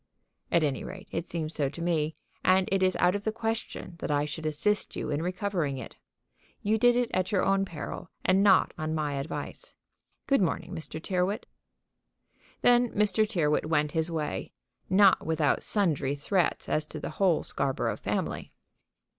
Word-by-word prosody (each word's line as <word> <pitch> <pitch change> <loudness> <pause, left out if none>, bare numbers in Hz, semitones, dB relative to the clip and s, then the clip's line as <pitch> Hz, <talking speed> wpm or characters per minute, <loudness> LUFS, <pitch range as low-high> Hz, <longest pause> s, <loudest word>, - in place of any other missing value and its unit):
"At 170 - +3
any 140 -3 -1
rate - - -9
it 165 +1 -3
seems 160 -2 -3
so 140 -3 0
to 155 - -10
me; 160 -2 0 0.3
and 185 0 +4
it 195 -1 +2
is 185 -1 +3
out 180 +1 +3
of 205 0 -3
the 220 - 0
question 225 -5 -4
that - - -4
I 145 0 +1
should 155 +2 -4
assist 210 +7 0
you 150 - -3
in 145 +1 -1
recovering 180 -5 -1
it. 130 - -8 0.7
You 215 +2 +2
did 245 +1 +5
it 245 -1 +1
at 185 +2 0
your 195 - +2
own 195 0 +2
peril, 165 0 -7 0.2
and 185 +1 +4
not 200 -2 +5
on 155 0 -2
my 150 -2 -1
advice. 140 +3 -5 0.5
Good 275 -6 +3
morning, 180 0 -1
Mr. 160 -2 -5
Tyrrwhit." 185 +6 -1 1.2
Then 245 0 +5
Mr. 210 +1 +3
Tyrrwhit 155 -7 +1
went 150 -2 +1
his 160 +1 +2
way, 155 -3 -3 0.4
not 195 0 +5
without 160 -2 +1
sundry 150 -9 +2
threats 175 +5 0
as 155 - +1
to 155 - -7
the - - -5
whole 180 -5 +3
Scarborough 135 -1 -1
family. - - -3
170 Hz, 170 wpm, -28 LUFS, 155-200 Hz, 1.2 s, did